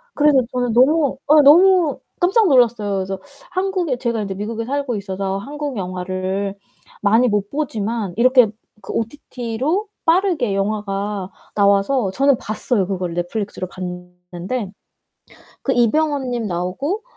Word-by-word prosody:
그래서 295 -2 +4
저는 245 -2 -1
너무 280 +3 +3 0.2
예 300 - +8
너무 345 +2 +5 0.2
깜짝 385 +4 +3
놀랐어요. 230 - +3
그래서 190 0 -3 0.3
한국에 370 -8 -1
제가 235 -3 -1
이제 195 -1 -3
미국에 220 +3 -4
살고 275 -2 -2
있어서 195 -1 -3
한국 290 +3 -5
영화를 185 +1 -3 0.5
많이 225 +4 +4
못 205 -2 0
보지만 225 -8 -3
이렇게 255 0 +5 0.3
그 195 - -7
OTT로 260 - -3 0.2
빠르게 330 - +2
영화가 200 -1 -2 0.3
나와서 200 +2 +2
저는 275 +4 +3
봤어요 210 -1 -1
그거를 180 -3 -3
넷플릭스로 185 +1 -3
봤는데 180 +4 -6 0.9
그 270 - 0
이병헌 270 +3 +1
님 240 -2 -2
나오고 195 - -2
225 Hz, 300 characters per minute, -20 LUFS, 195-280 Hz, 0.9 s, 예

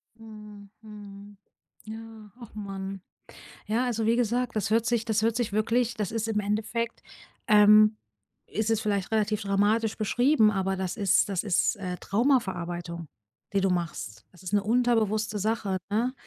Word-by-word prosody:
Mhm, 210 -2 -12
mhm. 205 -1 -12 0.5
Ja. 220 -1 -10
Ach 235 -3 -12
Mann. 195 -2 -6 0.7
Ja, 235 +4 +1
also, 230 -3 -1
wie 230 - +3
gesagt, 245 0 0
das 200 -2 -1
hört 225 +1 +2
sich 235 -1 0
das 220 -2 +1
hört 225 0 +1
sich 230 -4 -2
wirklich 235 +2 +1
das 210 -4 -3
ist 225 -1 -2
im 220 -2 0
Endeffekt, 215 +3 -2 0.5
ähm 215 +1 +6 0.6
ist 220 +3 -1
es 225 -1 +1
vielleicht 200 -1 -1
relativ 215 0 +1
dramatisch 205 +3 +1
beschrieben, 240 +1 +3
aber 195 -1 -1
das 190 +3 -4
ist 200 0 +3
das 190 0 -1
ist, 200 -1 +1
äh, 185 -3 -4
Traumaverarbeitung, 175 - -1 0.5
die 195 - +2
du 195 - +2
machst. 160 -12 -4
Das 180 +1 -17
ist 185 +3 -6
'ne 205 - +4
unterbewusste 220 -2 +1
Sache, 210 -2 -1
ne? 230 +5 0
215 Hz, 160 wpm, -27 LUFS, 200-225 Hz, 0.7 s, ähm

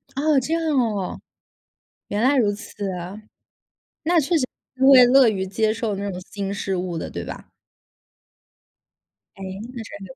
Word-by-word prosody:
哦， 290 0 +3
这 295 +6 -3
样 330 - 0
哦。 210 -7 -1 0.9
原 205 +1 -2
来 265 +3 +4
如 210 -4 +3
此 205 -1 -6
啊。 180 +4 -7 0.8
那 335 +1 +3
确 335 +5 +1
实 270 -5 +1 0.4
会 255 -2 +9
乐 260 -1 +6
于 190 -3 -1
接 215 +3 +1
受 225 -2 -2
那 200 +1 -3
种 180 -1 -6
新 200 -1 -4
事 195 -1 -2
物 180 -1 -3
的， - - -5
对 - - -5
吧？ - - -9 1.9
哎， 195 - -9 0.3
那 235 - -6
真 205 -2 -10
的。 175 - -13
215 Hz, 170 characters per minute, -23 LUFS, 195-260 Hz, 1.9 s, 会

